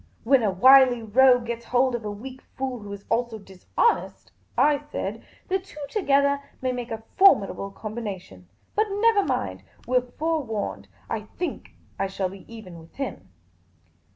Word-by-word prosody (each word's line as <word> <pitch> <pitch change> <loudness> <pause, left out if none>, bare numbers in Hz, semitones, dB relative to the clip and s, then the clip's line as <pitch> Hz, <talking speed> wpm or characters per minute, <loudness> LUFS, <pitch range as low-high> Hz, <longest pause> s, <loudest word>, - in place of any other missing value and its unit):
" - - -35
When 265 +1 +4
a 215 - +2
wily 250 +4 +6
rogue 245 +2 +5
gets 235 0 -5
hold 250 +1 +2
of 240 -2 -3
a 210 - -3
weak 255 +6 -8 0.2
fool, 260 -2 -3
who 205 -1 -9
is 200 0 -8
also 235 -1 -1
dishonest," 195 - -1 0.3
I 295 -1 +4
said, 295 +1 -5
" - - -31
the 380 +1 +1
two 370 -5 -14
together 280 -7 +2 0.2
may 255 -1 -1
make 245 -1 -5
a 225 -1 -5 0.2
formid 375 - +6
able 195 - -6
combination. 200 - -7 0.3
But 430 +1 +2
never 410 +1 +3
mind. - - -2 0.3
We 250 +1 +4
're - - -6 0.2
forewarned. 225 - -2 0.2
I 215 -1 -4
think 355 - -5 0.2
I 195 - +1
shall 190 -1 -2
be 195 +3 -13
even 185 -7 -10
with 165 0 -17
him." 275 -1 -5
240 Hz, 175 wpm, -25 LUFS, 205-275 Hz, 0.3 s, wily